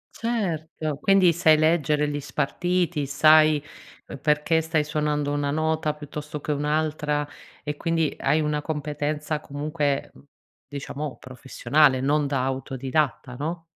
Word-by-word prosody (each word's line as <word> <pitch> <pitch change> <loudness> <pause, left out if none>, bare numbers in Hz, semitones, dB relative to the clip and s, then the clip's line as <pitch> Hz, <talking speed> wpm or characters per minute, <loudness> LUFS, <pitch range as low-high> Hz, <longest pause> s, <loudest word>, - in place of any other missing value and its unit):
Certo, 160 -10 -3
quindi 195 -3 +5
sai 160 -2 +4
leggere 155 -2 +2
gli 145 0 -3
spartiti, 170 +1 -1
sai 155 +1 +5 0.6
perché 150 +2 +2
stai 160 -1 0
suonando 150 -1 -1
una 145 -1 -1
nota 155 0 0
piuttosto 150 0 -7
che 150 - -4
un'altra 150 0 -1 0.4
e 150 0 -3
quindi 165 -2 0
hai 155 - +2
una 150 -1 -1
competenza 150 0 -3
comunque, 145 -1 -2
mhmm, - - -18 0.4
diciamo 140 -2 -6
professionale, 130 +2 +1
non 145 +2 +1
da 135 -2 -1
autodidatta, 135 0 -2
no? 165 +2 -4
150 Hz, 120 wpm, -24 LUFS, 145-155 Hz, 0.6 s, quindi